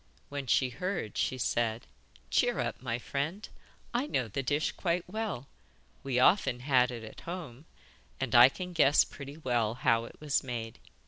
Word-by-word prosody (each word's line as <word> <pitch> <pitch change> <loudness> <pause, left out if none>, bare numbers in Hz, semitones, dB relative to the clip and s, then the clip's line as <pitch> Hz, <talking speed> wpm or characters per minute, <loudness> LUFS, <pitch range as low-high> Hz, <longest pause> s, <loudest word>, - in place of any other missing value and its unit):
When 140 -2 -5
she 130 +2 +3
heard 180 - -3
she 130 - 0
said: 115 -1 0 0.5
'Cheer - - +2
up, - - -2
my 120 -2 -2
friend. 145 - -3 0.5
I 250 +4 0
know 130 - 0
the 110 +6 -3
dish 145 +4 0
quite 175 -1 -1
well: 195 - -4 0.5
we 130 -2 -2
often 125 -3 +4
had 125 -2 +3
it 120 -2 -6
at 110 - -10
home, 160 -6 -7 0.5
and 130 -2 -2
I 120 +1 +9
can 180 +5 -7
guess 150 -3 +5
pretty 140 +1 -10
well 120 -7 0
how 115 -2 +2
it - - -13
was 150 -2 0
made. 115 -3 -5
135 Hz, 170 wpm, -30 LUFS, 120-160 Hz, 0.5 s, I